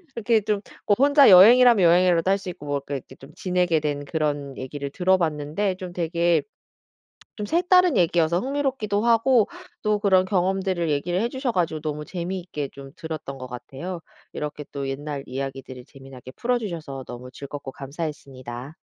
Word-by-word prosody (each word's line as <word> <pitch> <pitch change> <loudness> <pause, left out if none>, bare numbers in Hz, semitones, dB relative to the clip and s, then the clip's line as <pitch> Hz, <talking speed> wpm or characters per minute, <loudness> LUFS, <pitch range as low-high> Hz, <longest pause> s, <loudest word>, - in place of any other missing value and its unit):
그렇게 230 -1 +2
좀 205 0 -1 0.3
뭐 205 - +5
혼자 285 0 +6
여행이라면 230 +3 +8
여행이라도 175 +1 +4
할 195 - +3
수 195 -2 -7
있고 165 -4 -9
뭐 145 -1 -2
이렇게 135 -2 -6
좀 135 +3 -15
지내게 180 -3 +1
된 145 -1 -3
그런 145 -3 -2
얘기를 140 +2 -5
들어 185 +5 +2
봤는데 160 +4 -1
좀 180 -1 -8
되게 170 0 +1 0.9
좀 210 - -4
색다른 355 - +4
얘기여서 170 -1 +2
흥미롭기도 260 -6 -1
하고 235 0 +4 0.3
또 210 -1 +1
그런 190 -3 +4
경험들을 185 -2 0
얘기를 170 +5 0
해 235 - 0
주셔 260 0 -2
가지고 165 -6 -1
너무 150 -1 -4
재미있게 175 -5 -5
좀 135 -1 -11
들었던 155 -4 -6
것 130 - -7
같아요. 135 +8 -7 0.3
이렇게 150 0 -5
또 140 -1 -4
옛날 140 +1 -5
이야기들을 135 -1 -6
재미나게 135 -3 -12
풀어 245 - 0
주셔서 160 - -6
너무 125 +1 -8
즐겁고 140 +1 -8
감사했습니다. 135 -2 -7
170 Hz, 380 characters per minute, -24 LUFS, 140-200 Hz, 0.9 s, 여행이라면